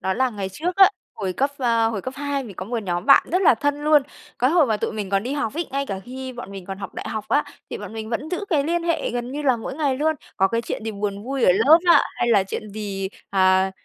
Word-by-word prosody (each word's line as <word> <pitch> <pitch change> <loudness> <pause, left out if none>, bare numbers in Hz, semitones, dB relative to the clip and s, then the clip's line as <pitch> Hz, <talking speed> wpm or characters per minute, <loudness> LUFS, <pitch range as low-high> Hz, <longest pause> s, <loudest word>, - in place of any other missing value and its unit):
đó 190 - -1
là 260 +2 +1
ngày 200 -4 -4
trước 350 - -3
á, 385 -1 +8 0.3
hồi 190 -3 -3
cấp 275 +8 0
ờ, 230 -3 +2
hồi 220 -3 -3
cấp 260 +6 -6
2 285 -1 -2
mình 210 -5 -10
có 185 - -5
một 235 +3 -3
nhóm 175 -1 -3
bạn - - +8
rất 365 +2 +2
là 340 - +6
thân 290 +5 -1
luôn. 300 -1 +5 0.4
Cái 255 +2 +3
hồi 330 -3 +4
mà 220 -3 +1
tụi - - -3
mình 210 -3 -5
còn 195 0 +1
đi 255 - -3
học 285 -5 -2
ấy, 335 +2 -2
ngay 275 +1 -2
cả 195 -4 -4
khi 260 +2 -7
bọn 240 -5 -8
mình 195 -2 -9
còn 195 -1 -6
học 200 - -7
đại - - -5
học 215 -1 -4
á, 285 +6 +2 0.3
thì - - -4
bọn - - -8
mình 220 -1 -6
vẫn 240 +6 -3
giữ 365 +3 -2
cái 295 -5 +2
liên 340 +2 0
hệ 335 -1 -1
gần 245 +1 -4
như 295 +2 -4
là 260 -4 +3
mỗi 230 +3 -6
ngày 280 -3 0
luôn, 315 +3 +1 0.2
có 195 - +3
cái 230 +3 0
chuyện 220 - -5
gì 225 - -2
buồn 200 -1 -4
vui 265 0 -1
ở 180 - +6
lớp 270 - +6
á, - - +7
hay 240 - 0
là 210 -4 +5
chuyện 205 +2 -6
gì, 200 -2 -4 0.2
à, 190 -1 +3
240 Hz, 290 wpm, -23 LUFS, 200-285 Hz, 0.4 s, á